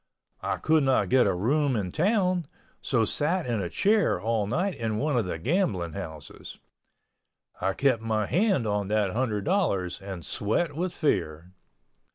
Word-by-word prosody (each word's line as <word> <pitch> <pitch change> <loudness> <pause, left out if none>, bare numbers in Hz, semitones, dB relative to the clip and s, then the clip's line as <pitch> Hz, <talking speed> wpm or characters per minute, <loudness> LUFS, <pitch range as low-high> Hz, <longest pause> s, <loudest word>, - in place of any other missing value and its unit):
I - - -1
could 160 0 +2
not 135 -2 +2
get 125 -3 +4
a 95 - +2
room 135 +8 +1
in 95 -5 -2
town, 180 -2 +1 0.3
so 115 -4 +1
sat 165 - 0
in 115 -4 -1
a 90 - -3
chair 210 - +2
all 110 -2 0
night 180 - 0
in 110 -5 -3
one 145 +3 0
of 115 -4 +1
the 90 - -3
gambling 95 - 0
houses. 80 -6 -8 1.0
I 95 - 0
kept 130 -3 +1
my 110 -2 0
hand 180 - +1
on 105 -2 -1
that 105 -2 +1
hundred 110 -3 -1
dollars 105 - 0
and 95 -3 -7
sweat 145 +9 -1
with 180 +3 -2
fear. 85 - -2
115 Hz, 165 wpm, -27 LUFS, 100-155 Hz, 1.0 s, get